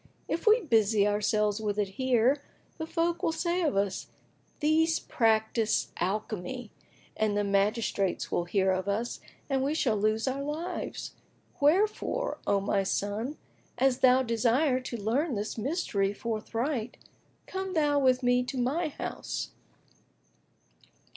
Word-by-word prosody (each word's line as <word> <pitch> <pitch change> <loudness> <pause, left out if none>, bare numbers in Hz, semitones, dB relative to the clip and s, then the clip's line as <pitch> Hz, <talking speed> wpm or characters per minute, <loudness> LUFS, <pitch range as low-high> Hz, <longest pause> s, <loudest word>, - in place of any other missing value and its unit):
If 335 - -3
we 440 +3 +6
busy 220 - +3
ourselves 210 0 +1
with 210 -1 -2
it 205 -2 0
here, 260 +5 +2 0.4
the 320 - -3
folk 335 +1 0
will - - +1
say 345 +2 -1
of 300 - +1
us, 200 -1 -1 0.5
These 320 +2 +3
practise 220 -1 +1
alchemy; 210 +4 -3 0.4
and 215 -1 +1
the 205 - +2
magistrates 200 -1 0
will 175 - 0
hear 190 +1 +2
of 185 +1 -1
us, 220 +4 -2 0.3
and 270 -2 0
we 290 +3 0
shall 240 -8 +2
lose 215 +3 +1
our 265 +1 -1
lives.[FN#17] 300 +1 -6
Wherefore, 420 +10 +2
O 200 - +3
my 195 0 +1
son, 205 +8 -2 0.4
an 265 +2 +4
thou 260 0 +6
desire 250 +4 +2
to 255 -2 -5
learn 245 +7 0
this 210 +1 -3
mystery 220 - -1
forthright, 230 +3 -3 0.5
come 380 -1 -4
thou 295 -2 +3
with 255 -1 +3
me 245 0 +4
to 260 +2 -5
my 280 +8 0
house." 295 - -5
235 Hz, 135 wpm, -29 LUFS, 210-290 Hz, 0.5 s, we